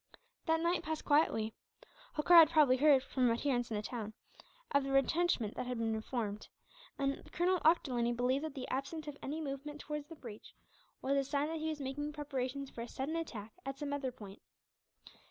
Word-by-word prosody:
That 320 0 +3
night 340 +1 +1
passed 315 0 -4
quietly. 225 -7 +3 0.6
Holkar 300 +4 +3
had 320 -2 +8
probably 300 -6 +5
heard, 280 -1 +5
from 255 -3 +1
adherents 245 +1 0
in 220 - -2
the 210 - -3
town, 220 -2 -5 0.6
of 280 0 +3
the 275 - -3
retrenchment 275 -4 +2
that 250 - -4
had 250 -1 -2
been 225 -1 -1
formed; 215 -3 -3 0.5
and 275 0 -2
Colonel 360 +1 +2
Ochterlony 255 -8 +3
believed 250 +4 +1
that 310 - -6
the 260 -2 -5
absence 280 +4 -3
of 295 - -5
any 300 +4 -3
movement 295 0 -5
towards 300 -1 -5
the 330 - -10
breach 230 -8 -11 0.5
was 275 +1 +2
a 275 - +3
sign 280 +2 -1
that 325 0 -3
he 315 +1 -1
was 310 -2 -3
making 290 +2 -3
preparations 275 -2 -3
for 230 - -7
a 235 - -5
sudden 275 +6 -3
attack 225 -10 -5
at 270 0 -5
some 285 0 -3
other 270 -3 -2
point. 205 -5 -11
275 Hz, 190 wpm, -34 LUFS, 245-300 Hz, 0.6 s, had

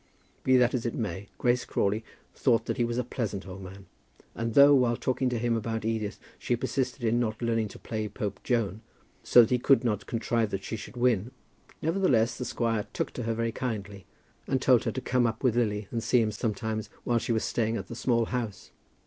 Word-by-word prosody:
Be 130 0 +5
that 125 -1 +4
as 125 -3 -1
it 120 - -2
may, 100 -3 -4
Grace 125 0 +2
Crawley 105 +3 0 0.3
thought 115 -4 +2
that - - -2
he 120 - +2
was 120 0 -1
a 125 - +1
pleasant 110 -5 -4
old 95 +1 -8
man; 95 +1 -10 0.5
and 115 -1 -3
though, 140 +1 +8
while 125 -3 +3
talking 130 0 0
to 125 - -1
him 115 0 +1
about 115 0 -2
Edith, 110 -2 -2 0.2
she 120 - 0
persisted 130 +1 -2
in 115 +1 +2
not 110 -2 -1
learning 115 -2 0
to - - -11
play 110 -1 -4
Pope 100 0 -4
Joan, 110 -4 0 0.4
so 120 - +7
that 115 - +2
he 125 - +3
could 135 +2 +4
not 105 -4 -1
contrive 115 -1 0
that 95 -1 -4
she - - -4
should 110 +3 -9
win, 120 -3 +2 0.5
nevertheless 155 -9 +2
the 125 - -5
squire 115 -4 -1
took - - -2
to 125 - -5
her 115 0 0
very 115 0 -1
kindly, 105 -5 -5 0.4
and - - +1
told - - +4
her - - +1
to - - -4
come 125 -2 +2
up 115 +2 -4
with 125 -3 +3
Lily 105 -4 0
and 115 - -2
see 125 - +3
him 110 -2 +1
sometimes 110 0 -3
while 120 -1 +2
she 120 - -3
was 110 -1 +1
staying 115 -1 0
at - - -5
the - - -7
Small 115 -1 +1
House. 115 -5 -4
115 Hz, 220 wpm, -28 LUFS, 110-120 Hz, 0.5 s, though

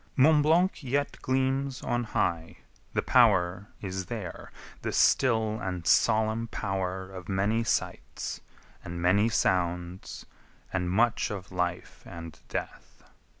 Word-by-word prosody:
V 130 - +4
Mont 155 0 +6
Blanc 170 +6 +3
yet 140 +1 -2
gleams 135 +1 0
on 120 -1 -1
high: 85 -6 -1 0.3
the - - 0
power 90 +3 +3 0.2
is 95 -1 -4
there, 100 -7 -6 0.3
The - - -2
still 110 -4 +3
and 90 -3 -4
solemn 110 +2 +3
power 95 -3 -3
of 95 -2 -9
many 100 +4 +1
sights, 115 - -3 0.4
And 85 0 -6
many 100 +6 +3
sounds, 90 -3 -1 0.5
and 90 -1 0
much 110 +4 +2
of 95 -2 -6
life 90 -1 -3
and 85 -1 -9
death. - - -6
100 Hz, 125 wpm, -28 LUFS, 90-120 Hz, 0.5 s, Mont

